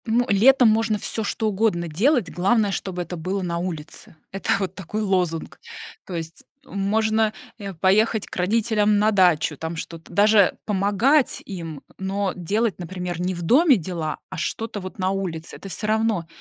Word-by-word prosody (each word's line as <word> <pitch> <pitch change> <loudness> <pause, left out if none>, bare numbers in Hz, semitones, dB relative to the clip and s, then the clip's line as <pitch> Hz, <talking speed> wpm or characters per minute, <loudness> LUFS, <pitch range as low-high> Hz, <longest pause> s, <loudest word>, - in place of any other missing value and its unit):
Ну, 235 +2 +2
летом 245 +4 +6
можно 220 0 +2
всё 220 +2 -3
что 215 +2 -1
угодно 200 -4 0
делать, 205 - +1
главное, 200 +3 +2
чтобы 180 -2 -3
это 175 +1 -7
было 185 +4 -2
на 170 -1 -2
улице. 170 -3 -7 0.2
Это 195 - -6
вот 190 -3 -3
такой 195 +3 -5
лозунг. 180 -5 -1 0.5
То 180 - -6
есть, 165 0 -6 0.2
э, - - -21
можно, 215 +2 +1 0.2
э, 200 -3 -6
поехать 205 +5 +2
к - - -10
родителям 210 +2 +2
на 215 +1 +3
дачу, 175 -6 +3
там 160 +3 -5
что-то 165 0 -8
даже 205 -1 +5
помогать 210 +8 +2
им, 165 -7 -7 0.2
но 195 0 -2
делать, 200 +2 -1
например, 180 -1 -5
не 185 +1 -1
в 175 - -6
доме 270 - +5
дела, 165 -3 -4
а - - -7
что-то 215 +5 -3
вот 185 +1 -9
на 185 0 +1
улице. 180 -4 -4
Это - - -10
всё 210 +5 -4
равно. 215 -5 +1
195 Hz, 170 wpm, -23 LUFS, 175-215 Hz, 0.5 s, летом